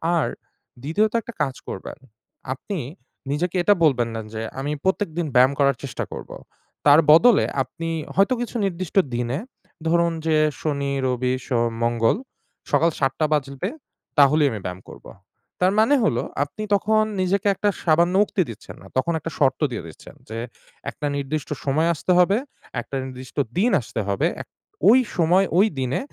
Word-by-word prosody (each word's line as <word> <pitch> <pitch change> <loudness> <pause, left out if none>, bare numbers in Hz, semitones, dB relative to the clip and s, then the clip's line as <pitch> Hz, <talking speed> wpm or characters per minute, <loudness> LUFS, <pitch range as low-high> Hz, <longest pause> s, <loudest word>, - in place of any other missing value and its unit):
আর 165 - +2 0.6
দ্বিতীয়ত 205 +10 +1
একটা 235 - -9
কাজ 135 -3 0
করবেন, 95 - -7 0.6
আপনি 195 +9 -6 0.5
নিজেকে 175 +5 -1
এটা 205 - +6
বলবেন 125 -6 +3
না - - -3
যে 110 - -4 0.2
আমি 140 +2 -2
প্রত্যেকদিন 175 -3 0
ব্যায়াম 130 +2 +6
করার 140 -2 +3
চেষ্টা 135 -4 -4
করব। - - -8 0.6
তার 145 +2 +8
বদলে, 225 +8 +6 0.2
আপনি 165 +6 -6 0.3
হয়তো 195 +8 +4
কিছু 240 0 -5
নির্দিষ্ট 185 -3 -4 0.2
দিনে 120 +3 -1 0.5
ধরুন 170 0 +2
যে 160 - +3 0.3
শনি, 140 -2 -1 0.2
রবি, 125 0 0
সোম, 120 -2 +1
মঙ্গল 115 - +2 0.5
সকাল 165 - +4
৭ঃ০০ 135 +2 +1
বাজবে, 140 +4 -2 0.5
তাহলেই 145 +1 +5
আমি 105 - -4
ব্যায়াম 90 +1 -5
করব। - - -13 0.6
তার 185 - +4
মানে 250 +7 +5
হলো 215 - +1 0.2
আপনি 145 +9 -7
তখন 215 +2 +2 0.2
নিজেকে 190 +2 +1
একটা 205 - +1
সামান্য 170 +2 +3
উক্তি 200 - -1
দিচ্ছেন 110 -2 -10
না। 95 - -13
তখন 170 +6 +1
একটা 165 +2 -6
শর্ত 135 -3 +2
দিয়ে 110 -8 -5
দিচ্ছেন 80 - -13
যে, 115 - -5 0.5
একটা 150 - -6
নির্দিষ্ট 140 +1 -3 0.2
সময় 155 +4 +2
আসতে 175 +4 -2
হবে, 195 +4 +4 0.4
একটা 135 - -8
নির্দিষ্ট 130 +1 -9 0.2
দিন 225 +7 +3
আসতে 110 - -6
হবে। 100 -1 +1
এক - - -11 0.4
ওই 250 +4 +7 0.2
সময় 175 +3 +4
ওই 210 - +6
দিনে, 130 0 -1
150 Hz, 160 wpm, -23 LUFS, 130-185 Hz, 0.6 s, তার